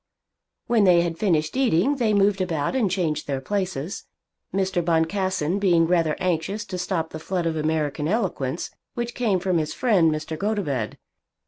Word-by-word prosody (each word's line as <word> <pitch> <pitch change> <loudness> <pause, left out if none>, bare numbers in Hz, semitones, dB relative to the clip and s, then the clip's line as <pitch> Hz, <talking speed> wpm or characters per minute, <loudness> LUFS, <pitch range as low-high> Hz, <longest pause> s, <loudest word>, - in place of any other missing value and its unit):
When 235 -3 +3
they 180 -3 +6
had 170 -1 -3
finished 160 -5 +1
eating 260 - +2
they 230 -4 +2
moved 200 -1 +3
about 165 - -1
and 230 -7 +2
changed 165 -5 -1
their 140 -2 -1
places, 185 0 -3 0.5
Mr. 190 -2 0
Boncassen 175 +1 0
being 175 -4 +4
rather 165 -3 +2
anxious 185 +5 -1
to 185 -2 -5
stop 175 -3 -2
the 160 - -6
flood 175 +1 -2
of 165 -1 0
American 155 -1 -1
eloquence 175 - -1 0.2
which 240 0 -3
came 215 -7 +1
from 180 -2 +1
his 155 -1 -3
friend 195 -10 +3
Mr. 155 +1 -3
Gotobed. 185 - -1
180 Hz, 160 wpm, -24 LUFS, 160-200 Hz, 0.5 s, they